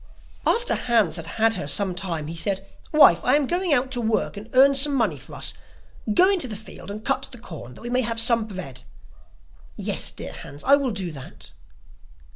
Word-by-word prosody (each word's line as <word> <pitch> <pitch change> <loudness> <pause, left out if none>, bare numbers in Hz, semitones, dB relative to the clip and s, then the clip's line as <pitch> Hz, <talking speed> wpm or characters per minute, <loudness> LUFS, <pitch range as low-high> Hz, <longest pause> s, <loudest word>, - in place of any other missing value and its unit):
After 475 +2 +2
Hans 225 -8 +1
had - - -7
had 225 -1 +3
her 145 - -5
some 190 +5 +3
time, 175 -4 -3
he 165 +2 -6
said: 195 +3 -2 0.2
'Wife, 290 - +6
I 255 - +4
am 295 -1 +2
going 350 +4 0
out 260 -1 +3
to 245 -2 0
work 220 -1 -1
and 210 +3 -9
earn 270 +2 +6
some 275 +1 +3
money 210 - 0
for - - -11
us; - - -3 0.6
go 360 - +5
into 380 -9 +1
the 215 - -5
field 215 -1 -10
and 215 +2 -8
cut 270 0 +1
the 245 - -9
corn 160 - -10
that - - -13
we 240 - -6
may 250 +1 +2
have 230 -1 -1
some 230 -1 +5
bread.' 185 - -7 0.9
'Yes, - - -2
dear - - -8
Hans, 145 +1 -10
I 280 - +6
will 280 -2 -1
do 190 -5 -4
that. 135 -4 -11
225 Hz, 210 wpm, -23 LUFS, 185-265 Hz, 0.9 s, Wife